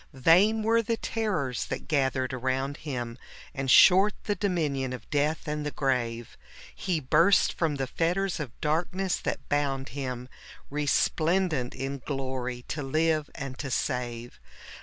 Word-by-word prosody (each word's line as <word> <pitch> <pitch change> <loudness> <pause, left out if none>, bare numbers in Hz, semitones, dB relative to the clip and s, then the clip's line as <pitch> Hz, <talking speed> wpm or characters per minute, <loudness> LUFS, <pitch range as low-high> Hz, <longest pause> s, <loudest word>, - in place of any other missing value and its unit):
Vain 185 +11 +4
were 230 +1 +3
the 230 +1 -1
terrors 185 - -2
that - - -5
gathered 130 -3 0
around 130 +3 -1
Him, 125 -5 -5 0.3
And 135 -1 -3
short 190 +9 +7
the 205 - 0
dominion 150 -11 -1
of 125 -4 -8
death 150 +3 0
and 150 0 -2
the 150 - -2
grave 120 -5 -2 0.2
\ - - -17
He 180 -4 -1
burst 165 +8 +4
from 160 -4 0
the 135 -1 -1
fetters 175 +6 -1
of 140 -6 -7
darkness 175 +5 0
that - - -4
bound 140 -2 -1
Him, 125 -3 -5 0.4
Resplendent 155 0 +1
in 135 +1 -4
glory, 130 -2 -4
to 150 - -3
live 155 +2 +1
and 135 -1 -6
to 140 - -4
save. 120 -2 -3
145 Hz, 145 wpm, -28 LUFS, 130-165 Hz, 0.4 s, short